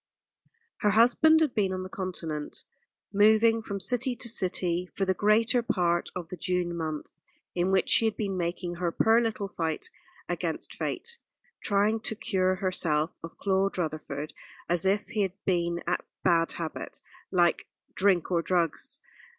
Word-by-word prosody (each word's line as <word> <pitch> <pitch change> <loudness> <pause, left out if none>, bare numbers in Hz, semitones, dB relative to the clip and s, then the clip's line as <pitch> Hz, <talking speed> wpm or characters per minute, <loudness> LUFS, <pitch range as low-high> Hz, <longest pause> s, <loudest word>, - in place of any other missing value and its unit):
Her 210 - +2
husband 245 +9 +5
had 305 -5 +2
been 195 -3 +1
on 185 0 -3
the - - -6
Continent, 170 -6 -5 0.5
moving 220 +2 +5
from 200 -2 -5
city 245 +5 +1
to 235 - -2
city, 180 -4 0
for 195 - 0
the 190 - +2
greater 215 +5 +3
part 175 -6 0
of 175 -2 -5
the 180 - -7
June 175 0 -1
month 155 -2 -4 0.4
in 180 +1 0
which 190 -1 +2
she 225 - +6
had 220 -2 0
been 200 -3 -2
making 175 0 -3
her 175 -1 -1
poor 225 +6 +4
little 220 -3 -2
fight 170 - -3 0.4
against - - -3
Fate 470 0 -4 0.4
trying 205 +2 +2
to 220 0 -3
cure 185 -3 0
herself 170 -4 0
of 165 - -9
Claude 195 0 +1
Rutherford, 155 -3 -4 0.3
as 175 +2 +2
if 200 +1 +1
he 215 -2 -1
had 190 -2 0
been 170 -2 0
a 180 - +1 0.3
bad 165 -2 +3
habit, 165 -2 -6 0.3
like 175 -2 +2 0.3
drink 190 -3 +2
or 170 -2 +2
drugs. 170 -2 -1
185 Hz, 160 wpm, -28 LUFS, 175-215 Hz, 0.5 s, she